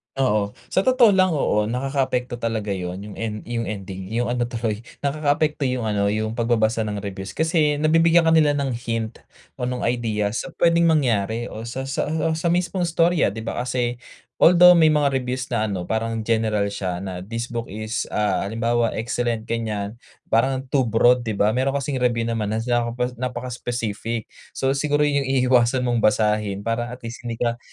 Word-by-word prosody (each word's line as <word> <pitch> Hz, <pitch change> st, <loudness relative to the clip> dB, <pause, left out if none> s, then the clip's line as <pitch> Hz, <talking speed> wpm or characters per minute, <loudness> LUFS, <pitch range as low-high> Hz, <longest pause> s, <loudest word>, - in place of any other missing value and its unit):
Oo, 105 Hz, -6 st, +1 dB, 0.2 s
sa 190 Hz, -, +1 dB
totoo 255 Hz, -4 st, +6 dB
lang, 185 Hz, -3 st, +3 dB
oo, 105 Hz, -7 st, +1 dB
nakakaapekto 125 Hz, 0 st, -1 dB
talaga 110 Hz, -3 st, -2 dB
'yon, 90 Hz, 0 st, -4 dB
yung 105 Hz, -1 st, -9 dB
en 105 Hz, -2 st, -4 dB
yung 115 Hz, -1 st, -2 dB
ending, 95 Hz, -2 st, -6 dB
yung 120 Hz, +1 st, 0 dB
ano 120 Hz, -1 st, 0 dB
tuloy, 115 Hz, -3 st, -3 dB, 0.2 s
nakakaapekto 145 Hz, 0 st, 0 dB
yung 125 Hz, -1 st, -1 dB
ano, 100 Hz, -1 st, +1 dB
yung 110 Hz, +2 st, -1 dB
pagbabasa 115 Hz, -1 st, +1 dB
ng 105 Hz, -1 st, -4 dB
reviews. 95 Hz, -1 st, -6 dB
Kasi, 155 Hz, -2 st, +1 dB
nabibigyan 165 Hz, +2 st, +5 dB
ka 165 Hz, -, +3 dB
nila 155 Hz, -3 st, +4 dB
ng 140 Hz, -2 st, -1 dB
hint 115 Hz, -1 st, -3 dB, 0.4 s
o 125 Hz, -, -2 dB
ng 125 Hz, 0 st, -3 dB
idea, 110 Hz, -4 st, 0 dB
sa 160 Hz, +10 st, -5 dB
puwedeng 170 Hz, 0 st, +3 dB
mangyari 120 Hz, -7 st, +1 dB
o 110 Hz, +2 st, -7 dB
sa 130 Hz, +3 st, -4 dB
sa 135 Hz, +1 st, -2 dB
o 160 Hz, +1 st, 0 dB
sa 170 Hz, -, -3 dB
mismong 175 Hz, +1 st, +1 dB
storya, 170 Hz, 0 st, +2 dB
'di 110 Hz, -, -6 dB
ba? 115 Hz, -, -4 dB
Kasi, 120 Hz, -1 st, -1 dB, 0.4 s
although, 180 Hz, +1 st, +7 dB
may 160 Hz, -, +6 dB
mga 150 Hz, -2 st, +3 dB
reviews 125 Hz, +1 st, -4 dB
na 110 Hz, -3 st, 0 dB
ano, 95 Hz, -4 st, -3 dB
parang 110 Hz, +3 st, -2 dB
general 110 Hz, -2 st, 0 dB
siya, 95 Hz, -2 st, -4 dB
na 95 Hz, -2 st, -5 dB
this 115 Hz, +6 st, -5 dB
book 115 Hz, -1 st, -3 dB
is, 110 Hz, +3 st, -4 dB
ah, 100 Hz, -2 st, +1 dB
halimbawa, 115 Hz, +1 st, 0 dB
excellent, 115 Hz, 0 st, -2 dB
ganyan, 110 Hz, -1 st, -3 dB, 0.3 s
parang, 130 Hz, +4 st, +2 dB
too 135 Hz, -4 st, +2 dB
broad, 120 Hz, +2 st, +3 dB
'di 110 Hz, -, -1 dB
ba? 105 Hz, +1 st, +2 dB
Meron 130 Hz, +4 st, 0 dB
kasing 140 Hz, -1 st, -2 dB
review 120 Hz, -2 st, +1 dB
naman, 110 Hz, -2 st, -2 dB
naka 120 Hz, +1 st, 0 dB, 0.2 s
napaka-specific, 120 Hz, -3 st, -4 dB, 0.2 s
so, 135 Hz, -, 0 dB
siguro 145 Hz, 0 st, +1 dB
'yon 140 Hz, -2 st, +1 dB
yung -, -, -4 dB, 0.2 s
iiwasan 125 Hz, 0 st, +3 dB
mong 120 Hz, -1 st, +1 dB
basahin, 105 Hz, -2 st, +1 dB
para, 115 Hz, +1 st, -1 dB
at 125 Hz, +1 st, -9 dB
least, 115 Hz, +1 st, -7 dB
hindi 115 Hz, -, -2 dB
ka 120 Hz, 0 st, -1 dB
120 Hz, 180 wpm, -22 LUFS, 110-135 Hz, 0.4 s, although